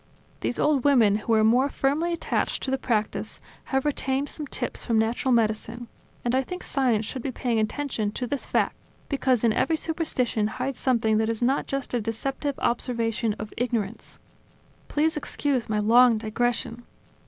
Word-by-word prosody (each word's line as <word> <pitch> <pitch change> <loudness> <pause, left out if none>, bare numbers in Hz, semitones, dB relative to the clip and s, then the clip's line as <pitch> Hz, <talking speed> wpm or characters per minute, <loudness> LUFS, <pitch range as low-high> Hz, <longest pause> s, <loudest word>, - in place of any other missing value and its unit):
These 245 - -1
old 290 -4 +2
women, 230 -8 +5
who 220 +2 -1
are 215 - +4
more 250 +5 +4
firmly 290 +6 0
attached 335 - -1
to 265 - -2
the 265 - 0
practice, 220 -5 -1 0.3
have 270 0 0
retained 275 -1 0
some 300 -2 -6
tips 245 -2 -3
from 230 - +1
natural 230 +4 +1
medicine; 230 +1 0 0.4
and 240 - +1
I 260 - +3
think 360 +7 -7
science 245 -6 +1
should 255 - -5
be 265 - -3
paying 235 -2 -1
attention 220 -1 -1
to 250 - -2
this 275 +2 -2
fact, - - 0 0.3
because 260 -4 +1
in 230 -2 +4
every 320 +7 +1
superstition 260 -10 0
hides 265 +4 -4
something 225 -4 +2
that 220 0 +1
is 230 +1 -1
not 265 +3 +1
just 275 -2 -3
a 240 - +1
deceptive 270 +6 -3
observation 230 -2 0
of 215 0 -7
ignorance... 230 -3 -3 0.7
Please 315 +2 +1
excuse 280 -4 -1
my 215 - +1
long 230 +2 +5
digression. 235 +2 -1
245 Hz, 170 wpm, -26 LUFS, 225-275 Hz, 0.7 s, women